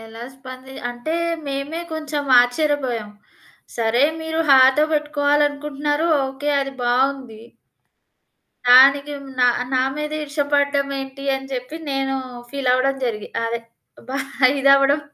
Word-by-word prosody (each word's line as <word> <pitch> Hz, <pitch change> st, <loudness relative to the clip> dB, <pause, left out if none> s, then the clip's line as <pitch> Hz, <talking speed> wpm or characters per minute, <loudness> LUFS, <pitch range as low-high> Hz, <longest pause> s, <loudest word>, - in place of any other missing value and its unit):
ఎలా 225 Hz, 0 st, -12 dB
స్పంది 260 Hz, 0 st, -11 dB, 0.2 s
అంటే, 245 Hz, +7 st, -5 dB, 0.3 s
మేమే 280 Hz, +4 st, -4 dB
కొంచెం 300 Hz, -3 st, -4 dB
ఆచ్చర్యపోయాం. 245 Hz, -4 st, -1 dB, 0.7 s
సరే 235 Hz, +3 st, +2 dB, 0.2 s
మీరు 320 Hz, 0 st, -2 dB
హాతో 265 Hz, +2 st, +6 dB
బెట్టుకోవాలనుకుంటున్నారు, 295 Hz, 0 st, 0 dB, 0.2 s
ఓకే 270 Hz, +2 st, -4 dB
అది 275 Hz, 0 st, -5 dB
బావుంది. 250 Hz, -2 st, -1 dB, 1.3 s
దానికి 275 Hz, +3 st, +6 dB
మ్ 275 Hz, -, -11 dB
నా, 250 Hz, -, +5 dB, 0.3 s
నా 255 Hz, -, +3 dB
మీద 300 Hz, 0 st, -4 dB
ఈర్ష్య 290 Hz, 0 st, -2 dB
పడడమేంటి 275 Hz, -1 st, -1 dB
అని 270 Hz, 0 st, -6 dB
జెప్పి, 255 Hz, +4 st, -5 dB
నేనూ 270 Hz, 0 st, -1 dB, 0.3 s
ఫీలవ్వడం 270 Hz, 0 st, +1 dB
జరిగి 215 Hz, -4 st, -4 dB, 0.2 s
అదే, 230 Hz, 0 st, -3 dB, 0.5 s
బా 270 Hz, +2 st, -3 dB, 0.4 s
ఇదవ్వడం 275 Hz, +2 st, +4 dB
275 Hz, 110 wpm, -20 LUFS, 255-290 Hz, 1.3 s, హాతో